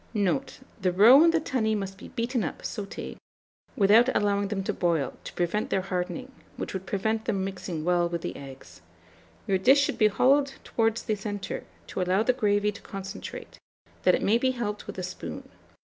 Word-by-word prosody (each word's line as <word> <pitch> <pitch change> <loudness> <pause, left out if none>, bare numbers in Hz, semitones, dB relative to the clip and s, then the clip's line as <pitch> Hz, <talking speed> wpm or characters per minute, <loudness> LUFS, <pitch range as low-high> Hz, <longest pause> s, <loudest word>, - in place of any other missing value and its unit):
Note. 210 +7 -1 0.2
The 185 -1 +2
roe 230 - +8
and 335 - +6
the 330 - +2
tunny 230 -8 0
must 195 -2 -4
be - - -10
beaten 235 0 -2
up 160 - -5
(sauté) 200 -1 -6 0.6
without 220 +5 +5
allowing 200 -1 +1
them 195 -1 -2
to - - -1
boil, 165 -6 0
to - - -7
prevent 175 +4 -1
their 190 -1 0
hardening, 195 +8 -3 0.3
which - - -5
would 190 -1 -5
prevent 220 +2 -1
them 190 -2 0
mixing 185 -4 -5
well 175 -1 +2
with 170 -1 -4
the - - -4
eggs. 135 -1 -11 0.6
Your 190 -1 +1
dish 265 +9 +6
should 285 - -1
be 215 - +6
hollowed 275 +6 +3
towards 225 0 0
the 220 - -1
centre, 205 -1 -5 0.2
to - - -4
allow 185 +3 +2
the 255 - +3
gravy 210 -4 +1
to 210 - -12
concentrate, 195 0 -8 0.4
that - - +4
it - - -3
may 225 +4 +3
be 260 - +2
helped 210 -3 -3
with - - -7
a 185 - -3
spoon. 85 - -7
205 Hz, 190 wpm, -27 LUFS, 185-230 Hz, 0.6 s, roe